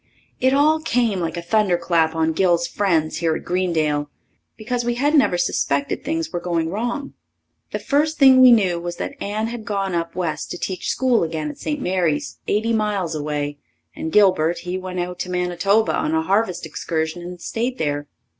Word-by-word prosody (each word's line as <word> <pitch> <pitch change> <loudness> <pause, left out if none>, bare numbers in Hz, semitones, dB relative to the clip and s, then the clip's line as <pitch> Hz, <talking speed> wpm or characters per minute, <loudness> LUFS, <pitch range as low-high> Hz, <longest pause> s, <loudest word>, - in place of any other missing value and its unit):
It 260 - +3
all 300 +3 +4
came 235 - +1
like 170 0 -3
a 170 - -4
thunderclap 170 -5 +1
on 160 0 +1
Gil's 170 -1 +2
friends 165 -6 0
here 165 -2 +1
at - - -6
Greendale, 160 -5 0 0.5
because 240 +2 -2
we 240 0 -1
hadn't 290 +4 +4
ever 175 - +1
suspected 140 -5 0
things 325 -1 -2
were 175 - -1
going 170 -2 -1
wrong. 240 +7 -3 0.6
The - - -2
first 300 +2 0
thing 265 -2 +7
we 255 -1 +9
knew 190 -7 +3
was 175 0 -5
that - - -4
Anne 210 +2 -2
had 235 -1 -6
gone 195 -3 -2
up 170 -1 -2
west 175 -4 -3
to - - -5
teach 185 0 -4
school 255 -2 +2
again 160 -2 -3
at - - -16
St. 300 -1 -3
Mary's, 180 - -1
eighty 220 +3 +1
miles 205 -6 0
away, 145 -1 -3 0.4
and 160 - -4
Gilbert, 175 -4 +3
he 180 +1 -3
went 185 -1 -4
out 180 0 -4
to 180 - -4
Manitoba 180 +4 +1
on 160 - 0
a 160 - +1
harvest 190 -1 0
excursion 160 +1 -3
and 175 0 -8
stayed 240 +8 -3
there. 145 -1 -2
180 Hz, 185 wpm, -21 LUFS, 165-225 Hz, 0.6 s, we